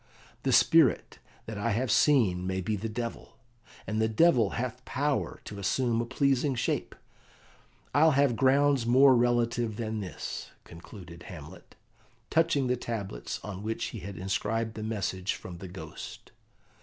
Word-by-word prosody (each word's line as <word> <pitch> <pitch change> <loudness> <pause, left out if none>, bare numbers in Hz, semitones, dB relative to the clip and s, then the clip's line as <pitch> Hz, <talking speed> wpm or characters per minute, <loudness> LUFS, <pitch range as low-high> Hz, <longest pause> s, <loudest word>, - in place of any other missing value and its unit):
The - - 0
spirit - - +4 0.3
that 110 -2 -6
I 115 +1 0
have 120 +2 0
seen 100 -12 +3
may 95 0 -1
be 105 +4 -1
the 110 +3 -4
devil; 115 +1 -6 0.5
and 110 0 -1
the 110 - +3
devil 115 - +4
hath 125 +1 -4
power 140 +2 -1
to 100 - -8
assume 115 +4 +1
a 120 - -4
pleasing 135 +1 +1
shape. 115 - -2 1.0
I'll 155 +3 +5
have 140 -4 +3
grounds 135 -1 +3
more 130 +2 +6
relative 120 -2 +1
than 110 -1 -3
this," 95 -5 -6
concluded 85 0 -12
Hamlet, 85 0 -11 0.6
touching 160 -4 +2
the 125 0 +1
tablets 100 - -5
on 100 -2 -6
which 110 +2 -3
he 115 - -5
had 95 0 -8
inscribed 110 +5 -2
the 110 - -7
message 100 -3 -2
from 85 -2 -9
the 95 - -7
Ghost. 80 -4 -9
115 Hz, 150 wpm, -29 LUFS, 95-130 Hz, 1.0 s, more